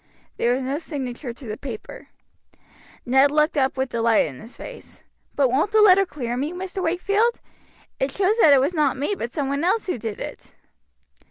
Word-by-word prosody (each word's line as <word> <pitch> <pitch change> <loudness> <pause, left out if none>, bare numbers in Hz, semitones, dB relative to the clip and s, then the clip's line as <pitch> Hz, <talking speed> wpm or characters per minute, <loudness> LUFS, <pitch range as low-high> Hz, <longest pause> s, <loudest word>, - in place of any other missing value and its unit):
There 240 +1 +2
was 265 - -3
no 275 +3 -2
signature 265 -5 -5
to 245 +3 -12
the 215 -1 -5
paper. 245 -6 -8 1.0
Ned 265 +3 +5
looked 300 +2 +2
up 265 -2 +1
with 265 0 -1
delight 230 -1 +2
in 135 -4 -8
his 230 - -12
face. - - -11 0.3
"But 275 -3 +3
won't 300 +11 +1
the 435 - +4
letter 390 -2 +6
clear 245 -7 -4
me, 290 +6 -2
Mr. 375 +1 -5
Wakefield? 400 +7 +1 0.6
It 270 - 0
shows 395 +9 +1
that 310 - +7
it 280 - +7
was 280 +7 +1
not 300 -5 +1
me, 290 +9 -1
but 235 -9 -5
some 285 0 -2
one 280 +3 -1
else 380 +6 +1
who 360 -10 -3
did 220 -2 -5
it." - - -8
280 Hz, 195 wpm, -23 LUFS, 250-360 Hz, 1.0 s, that